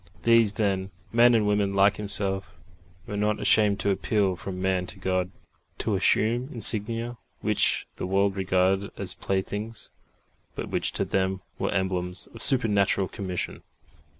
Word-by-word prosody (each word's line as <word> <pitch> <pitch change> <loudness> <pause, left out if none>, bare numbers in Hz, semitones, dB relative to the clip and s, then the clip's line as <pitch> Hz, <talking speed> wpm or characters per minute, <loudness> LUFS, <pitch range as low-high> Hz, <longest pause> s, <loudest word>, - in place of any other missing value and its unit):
These, 115 -3 +4
then, 95 -3 -1 0.2
men 120 +1 +6
and 110 -2 +2
women 105 -1 +1
like 100 +1 +3
himself, 100 -3 -2 0.5
were 105 - -6
not 105 +1 0
ashamed 105 -2 +3
to 100 - +1
appeal 100 -1 0
from 90 +2 -7
man 95 -1 0
to 95 - -6
God, 95 -1 -1 0.5
to - - -1
assume 120 +5 +2
insignia 115 +1 -1 0.2
which - - +2
the - - -4
world 100 +1 +1
regarded 95 +1 +1
as - - -3
playthings, 105 +3 -4 0.6
but - - -5
which - - 0
to - - +1
them 95 0 -1 0.2
were - - -1
emblems 90 -2 -1
of 115 - -10
supernatural 100 -7 +3
commission. 95 -3 -4
100 Hz, 145 wpm, -26 LUFS, 95-105 Hz, 0.6 s, men